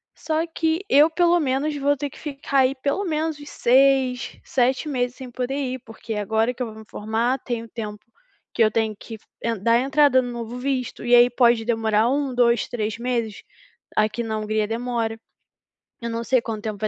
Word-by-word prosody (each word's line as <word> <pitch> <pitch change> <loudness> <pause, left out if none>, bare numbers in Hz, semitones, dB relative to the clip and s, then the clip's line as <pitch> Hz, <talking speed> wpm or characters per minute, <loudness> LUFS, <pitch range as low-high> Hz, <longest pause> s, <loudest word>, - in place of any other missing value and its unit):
Só 315 +1 -1
que 325 +1 -1
eu 295 +3 +6
pelo 345 +1 +3
menos 285 +2 0
vou 285 0 +1
ter 290 0 -3
que - - -15
ficar, 280 -2 -2
aí, 260 +1 +3
pelo 280 +8 -1
menos 315 -2 -1
uns 290 - -10
6, 260 0 +2
7 260 +3 +1
meses 245 -3 -1
sem 260 -2 -8
poder 255 +2 -3
ir, 260 -2 -3
porque 225 0 -7
agora 220 +3 0
que 250 - -4
eu - - -4
vou 220 - -10
me 220 - -12
formar, 225 +5 -1
tem 240 -2 -4
o - - -11
tempo 210 -3 -6 0.5
que 235 - +3
eu 215 - +3
tenho 220 -1 0
que 225 - -9
f 220 - -18 0.2
eh, 230 0 -1
dar 230 +4 +3
entrada 275 0 +4
no 245 -1 -5
novo 235 0 -6
visto 255 -1 -3
e 240 - +2
aí 240 0 +7
pode 240 -2 +3
demorar 225 -1 +2
1, 275 0 0
2, 235 -1 +3
3 220 -2 -3
meses, 235 -4 -3 0.5
aqui 215 +2 +1
na 220 -1 -3
Hungria 215 0 0
demora. 230 -1 -2 0.8
Eu 235 - -3
não 230 0 -3
sei 255 0 +2
quanto 220 -2 -5
tempo 215 -2 -4
vai 215 - 0
245 Hz, 205 wpm, -23 LUFS, 225-275 Hz, 0.8 s, aí